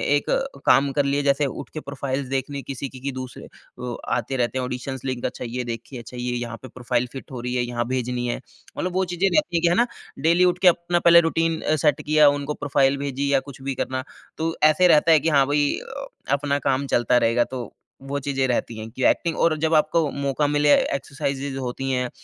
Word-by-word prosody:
एक 145 - -1
अ, 270 - -1
काम 135 +2 +4
कर 145 -1 +1
लिए 140 +1 +1
जैसे 140 +1 +2
उठ 135 - -6
के 155 - -4
प्रोफाइल्स 140 -1 -4
देखने 135 +1 -2
किसी 135 0 -6
की 130 - -11
कि 140 +2 -3
दूसरे 130 -1 -7
अ, 125 -1 -9 0.2
आते 135 - -2
रहते 120 +1 0
हैं 130 - -1
ऑडिशंस 125 +1 -5
लिंक 130 -2 -3
अच्छा - - -4
ये 125 +2 -3
देखिए 120 +2 -6
अच्छा 120 +2 -10
ये 125 0 -2
यहाँ 120 -1 -4
पे 130 - -7
प्रोफाइल 125 -1 -2
फिट 135 0 -9
हो 125 -2 -6
रही 125 0 -3
है 125 - +1
यहाँ 120 -1 -2
भेजनी 125 -1 -2
है। 120 - -3 0.4
मतलब 180 0 -2
वो 190 0 +1
चीज़ें 180 +3 +2
रहती 300 - +1
है 165 - 0
कि 170 - +3
है 175 - +3
ना, 240 +4 +3 0.3
डेली 170 +5 +4
उठ 180 0 +2
के 185 - +5
अपना 175 0 +3
पहले 170 0 +7
रूटीन 165 0 0 0.2
सेट 145 -1 +2
किया 150 -1 +5
उनको 145 +1 -2
प्रोफाइल 140 -1 +1
भेजी 140 0 -2
या 135 - +5
कुछ 135 - -15
भी 135 0 -3
करना 130 +1 -2 0.3
तो 165 +1 -1 0.2
ऐसे 180 +4 +4
रहता 165 0 +5
है 160 - +7
कि 165 - 0
हाँ, 140 -3 +4
भई 145 0 +1 0.6
अपना 140 0 -1
काम 135 +1 0
चलता 120 +1 +3
रहेगा 115 0 +3
तो 120 -4 -4 0.4
वो 140 +1 -2
चीज़ें 135 -1 -1
रहती 120 -2 -1
हैं 110 +1 -7
कि 130 - -5
एक्टिंग 165 -1 0
और 160 -2 +3
जब 160 +1 +1
आपको 155 0 +2
मौका 140 +1 -1
मिले 145 0 +4 0.2
एक्सरसाइजेज़ 140 -1 -4
होती 135 +1 -3
हैं 125 -1 0
140 Hz, 225 wpm, -23 LUFS, 125-150 Hz, 0.6 s, पहले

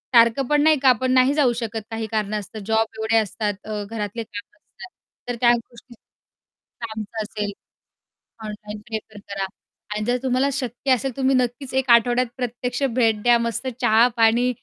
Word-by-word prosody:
सारखं 235 +3 +5
पण 295 +1 +3
नाही 310 -1 +5
का 260 -1 +6
पण 255 0 +1
नाही 255 +1 +4
जाऊ 275 -5 +3
शकत 225 -1 -4
काही 225 0 -3
कारणं 215 -1 -1
असतं, 215 +2 -9
जॉब 225 +1 +2
एवढे 220 +1 +1
असतात, 210 0 0
अ, 210 -1 -4
घरातले 225 0 -4
कामं 230 +1 -10
असतात. 375 -1 -14 0.4
तर 245 - -1
त्या 240 - +6
गोष्टी 240 +1 -11 1.0
आमचं 220 0 -5
असेल. 210 -1 -4 0.9
ऑनलाईन 210 0 -7
प्रिफर 220 -2 -6
करा 195 -1 -2 0.5
आणि 215 - -2
जर 245 +1 +1
तुम्हाला 260 +2 +2
शक्य 260 0 -2
असेल, 255 +2 -1
तर 250 - -20
तुम्ही 265 0 +2
नक्कीच 255 +2 -1
1 265 -1 -3
आठवड्यात 240 +1 +4
प्रत्यक्ष 245 +1 -3
भेट 225 -4 +2
द्या, 240 -1 +5
मस्त 235 +2 -2
चहा-पाणी, 235 +1 +4
235 Hz, 170 wpm, -22 LUFS, 220-255 Hz, 1.0 s, का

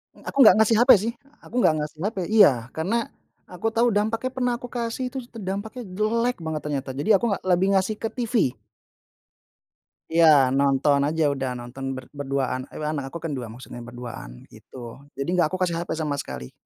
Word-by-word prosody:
Eee, - - -18
aku - - -6
nggak 215 - +8
ngasih 220 +1 +4
HP 245 +3 +6
sih, 230 +3 -2 0.3
aku - - -13
nggak - - +5
ngasih 150 +1 -6
HP 210 +2 -2
iya. 210 -6 +7 0.2
Karena 210 +9 -1 0.4
aku 180 +4 -4
tahu 230 +2 +2
dampaknya 225 +5 0
pernah 250 -1 0
aku 245 - -7
kasih 240 +1 -3
terus 260 -2 -6
tuh 230 - -9
dampaknya 205 +5 -5
jelek 225 +6 0
banget 160 -1 -3
ternyata, 140 -2 -3
jadi 145 +11 +2
aku 215 - +1
nggak 200 - -2
lebih 180 +1 +3
ngasih 190 +3 +1
ke 225 - -3
TV. 230 - 0 1.6
Iya 165 +1 +4 0.3
nonton 140 +1 +3
aja, 160 +1 0
udah 135 -2 -3
nonton, 120 +3 -8
ber 130 - -7 0.2
berduaan, 135 -2 -1
ewa 155 - -5
anak 145 -3 -3
aku 170 - -7
kan 165 - -3
2, 120 - -5
maksudnya 120 0 -10
berduaan 120 - -8 0.2
gitu. - - -15 0.4
Jadi 140 +3 -3
enggak 175 -3 +3
aku 185 - -3
kasih 175 -2 +1
HP 170 - -5
sama 150 -2 -1
sekali. 65 0 -8
180 Hz, 190 wpm, -24 LUFS, 140-225 Hz, 1.6 s, nggak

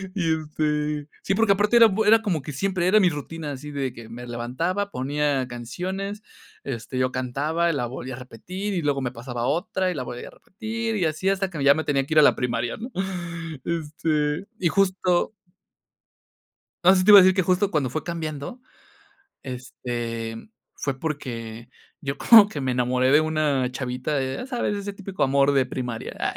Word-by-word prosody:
Y, 165 -5 +1
este. 150 -1 -2 0.2
Sí, 195 - 0
porque, 220 -1 +4
aparte 210 +4 +3
era 230 - +9
era 195 - -2
bue 220 +2 +4
como 180 -8 -1
que, 150 - -7
siempre 185 +3 0
era 215 +3 +5
mi 185 -3 +5
rutina, 150 0 -6
así 145 +2 -7
de 135 -3 -3
que 115 -1 -11
me 120 +2 -8
levantaba, 165 +13 -2
ponía 140 -1 0
canciones, 185 - -5 0.4
este, 130 -1 -5
yo 130 0 +1
cantaba, 145 +7 0
la 130 -4 -1
volvía 130 0 -6
a - - -10
repetir, 185 - -6
y 180 - -1
luego 145 -3 0
me 125 -2 -2
pasaba 120 0 -5
otra, 185 - 0
y - - -3
la 130 - -3
volvía 120 0 -7
a - - -15
repetir, 225 +2 -5
y 180 - +1
así, 160 +5 0
hasta 195 0 0
que 160 -6 -4
ya 140 0 +7
me 160 - -1
tenía 135 -2 +1
que 155 - -3
ir - - +8
a - - +7
la - - +6
primaria, 120 -1 -2
¿no? 240 +4 -7 0.7
Este, 155 -1 -1
y 175 - +2
justo 185 -2 +1 1.5
no, 185 +2 +7
sí, 185 -1 +2
te 210 - +8
iba 205 - +12
a - - +8
decir, 185 0 +6
que 190 - +2
justo 185 +3 +1
cuando 145 -6 0
fue 155 +6 -3
cambiando, 160 - -5 0.8
este, 120 -3 -5
mm, 115 - -11 0.3
fue, 135 -2 -3
porque, 120 -7 -5 0.3
yo 140 -1 -3
como 215 +2 +8
que 150 - -5
me 130 -2 -1
enamoré, 125 +1 +2
de 150 - +6
una 150 -5 0
chavita 130 +3 -3
de, 130 -1 -1
ya - - -5
sabes, 245 -5 -2
ese 200 0 -4
típico 195 -1 -3
amor 140 +1 +3
de 135 -2 +3
primaria, 125 -3 -5
ah, - - -1
150 Hz, 195 wpm, -24 LUFS, 130-185 Hz, 1.5 s, iba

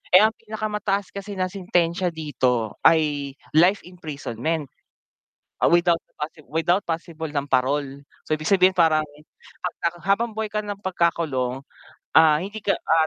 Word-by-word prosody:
eh, 185 - +10
ang 220 - +3
pinakamataas 210 -2 -2
kasi 200 0 -6
na 185 - +1
sentensya 180 -2 0
dito 125 -8 -1
ay 145 -4 +3 0.2
life 180 +6 +4
imprisonment. 155 -3 -4 1.0
Ah, - - +4
without 170 -1 +4 0.2
possible 150 -2 -7
without 175 +5 +2
possible 165 -1 -4
ng 140 -1 -2
parol. 135 +1 0 0.3
So, - - -3
ibig 155 0 -5
sabihin, 185 -1 +5
parang 160 -3 +4 0.6
'pag 180 - -3
na 170 - +3 0.2
habang 225 +4 +2
buhay 220 0 -2
ka 210 0 -2
ng 205 -1 -5
pagkakulong, 155 -8 0 0.5
ah, 155 -2 +7
hindi 205 +3 -6
ka, 200 - +1
ah 160 -1 +2
165 Hz, 145 wpm, -23 LUFS, 150-195 Hz, 1.0 s, eh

